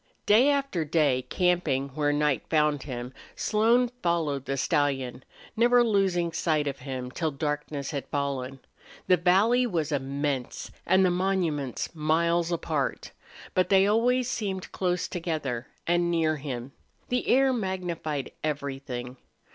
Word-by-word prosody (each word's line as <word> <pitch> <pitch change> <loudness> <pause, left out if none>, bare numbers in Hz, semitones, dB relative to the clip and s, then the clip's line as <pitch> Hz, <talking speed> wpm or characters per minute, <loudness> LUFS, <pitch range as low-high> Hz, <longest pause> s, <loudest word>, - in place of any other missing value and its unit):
Day 235 +7 +5
after 275 - 0
day, 145 -5 +1
camping 170 -7 +1
where 145 +2 0
night 150 -1 +1
found 150 -3 +2
him, 125 -2 -6 0.2
Slone 230 +3 +3
followed 155 -6 0
the 135 -1 -2
stallion, 135 -4 0 0.3
never 240 +1 +5
losing 190 -6 +1
sight 155 -2 0
of 140 -1 -3
him 130 -1 -5
till 160 +3 -1
darkness 150 0 -3
had 140 -3 -4
fallen. 135 -2 -3 0.4
The 180 - +4
valley 205 +9 +3
was 160 -7 -1
immense 140 -1 -2 0.2
and 190 0 +5
the 180 - +3
monuments 175 -9 -1
miles 170 +2 +1
apart. 155 -4 -2 0.4
But 185 - +2
they 195 0 +5
always 240 +4 +2
seemed 195 -7 -3
close 180 -1 -1
together 155 -8 -3 0.2
and 175 0 +2
near 160 -2 +1
him. 135 -3 -6 0.4
The 250 0 -1
air 265 +1 +4
magnified 175 - -3
everything. 135 -4 -4
160 Hz, 130 wpm, -27 LUFS, 140-185 Hz, 0.4 s, Day